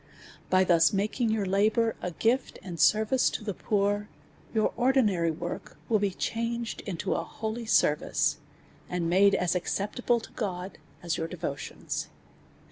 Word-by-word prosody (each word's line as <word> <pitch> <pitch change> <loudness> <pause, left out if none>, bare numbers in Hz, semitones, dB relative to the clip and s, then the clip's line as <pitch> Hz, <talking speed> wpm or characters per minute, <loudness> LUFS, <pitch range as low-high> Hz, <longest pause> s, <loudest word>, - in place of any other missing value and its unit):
By 185 0 +5
thus 170 -2 +5
making 215 +4 0
your 220 -2 0
labour 215 +4 +2
a 180 - -2
gift 230 +9 0
^nd 175 -3 -6
service 220 - +4
to - - -5
the 210 -2 -3
poor, 205 +1 0 0.4
your 220 -2 +1
ordinary 220 -10 +3
work 160 - -5
will 220 -2 +3
be 200 0 +1
changed 230 +4 -3
into 175 -5 -2
a - - -1
holy 225 +1 -5
service, 150 -8 +2 0.5
and 175 -2 -1
made 195 +3 +5
as 180 -1 +1
acceptable 210 +6 0
to 225 - -12
God 190 -3 -4 0.2
as 170 -1 -1
your 165 - -2
devotions. 160 -5 -4
200 Hz, 145 wpm, -28 LUFS, 180-225 Hz, 0.5 s, By